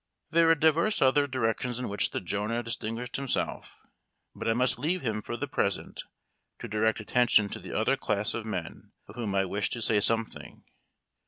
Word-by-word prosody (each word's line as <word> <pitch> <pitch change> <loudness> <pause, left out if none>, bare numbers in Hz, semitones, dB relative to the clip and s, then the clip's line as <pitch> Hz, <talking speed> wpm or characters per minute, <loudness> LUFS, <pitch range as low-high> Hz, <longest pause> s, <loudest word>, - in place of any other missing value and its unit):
There 165 0 +5
were 165 - +6
divers 160 +7 +2
other 145 +2 +4
directions 125 -2 -1
in 125 - -3
which 100 0 +1
the - - -3
Jonah 105 +6 -2
distinguished 115 +1 -4
himself; 135 -2 -3 0.6
but - - -3
I 115 - +2
must 125 0 +2
leave 170 +5 -1
him 110 -3 -1
for 120 - -5
the 145 - -3
present 100 -7 -2 0.6
to - - -7
direct 110 +1 +1
attention 110 -1 +3
to - - -6
the - - -5
other - - +2
class 105 0 +1
of 115 - -3
men 95 -7 -6
of - - -11
whom 110 -4 -3
I 95 0 +2
wish 100 +2 -1
to 120 - -4
say 110 -1 +2
something. 115 +2 -1
115 Hz, 185 wpm, -28 LUFS, 105-130 Hz, 0.6 s, were